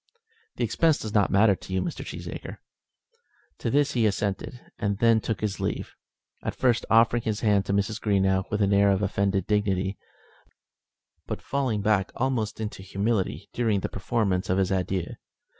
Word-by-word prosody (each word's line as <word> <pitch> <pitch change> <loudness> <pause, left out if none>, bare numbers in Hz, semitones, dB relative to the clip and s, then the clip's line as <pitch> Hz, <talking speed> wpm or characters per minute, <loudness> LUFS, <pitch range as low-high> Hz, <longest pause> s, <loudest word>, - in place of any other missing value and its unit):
"The - - -2
expense 160 -3 +2
does 110 -1 -6
not 105 -2 +3
matter 100 +1 +5
to 95 - -9
you, 95 - +1
Mr. 165 - -4
Cheesacre." - - -7 1.0
To 115 - -2
this 145 +4 +2
he 115 -4 +2
assented, 100 +4 -2 0.2
and 100 -2 0
then 115 0 +4
took 110 -3 -3
his 105 -2 -2
leave, - - -3 0.5
at - - -4
first 120 -2 +1
offering 115 +1 +4
his 110 -2 -2
hand 105 -3 +2
to - - 0
Mrs. 100 +2 0
Greenow 95 -2 +1
with 105 -1 0
an 100 0 +2
air 100 0 +5
of 100 +1 +2
offended 100 -1 0
dignity, 100 -2 0 1.3
but - - -3
falling 130 -7 -1
back 100 -3 +2
almost 120 -5 -1
into 105 -3 -5
humility 100 +1 -1
during 110 -5 +1
the - - -3
performance 100 -3 -1
of 95 - +2
his 95 -1 +1
adieu. 95 -1 0
105 Hz, 170 wpm, -26 LUFS, 95-115 Hz, 1.3 s, matter